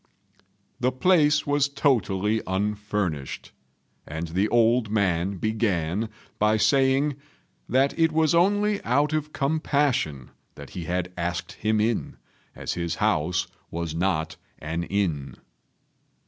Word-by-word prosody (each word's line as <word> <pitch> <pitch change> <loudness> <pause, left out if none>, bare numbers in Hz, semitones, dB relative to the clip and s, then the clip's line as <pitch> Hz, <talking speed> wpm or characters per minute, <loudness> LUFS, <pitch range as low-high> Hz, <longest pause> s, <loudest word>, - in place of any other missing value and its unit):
The 125 +1 +2
place 150 +1 +3
was 145 0 +2
totally 110 -7 +1
unfurnished; 100 -6 -2 0.6
and 80 +2 -5
the 95 +6 +1
old 115 -1 +3
man 95 -2 0
began 105 -2 -1 0.3
by 105 +1 +3
saying 135 +3 +3 0.5
that 135 +2 +3
it 165 -1 +4
was 155 -1 +2
only 205 +4 +2
out 145 +5 +2
of 150 -1 -1
compassion 140 - 0 0.2
that 70 -2 -11
he 90 -3 -6
had 90 +1 -2
asked 85 0 -3
him 110 0 0
in, 110 +1 -1 0.4
as - - -3
his 85 -1 -2
house 90 +4 +1 0.2
was 85 -1 -4
not 80 -2 -1 0.2
an 80 +2 -3
inn. 85 -9 -1
105 Hz, 120 wpm, -25 LUFS, 85-140 Hz, 0.6 s, it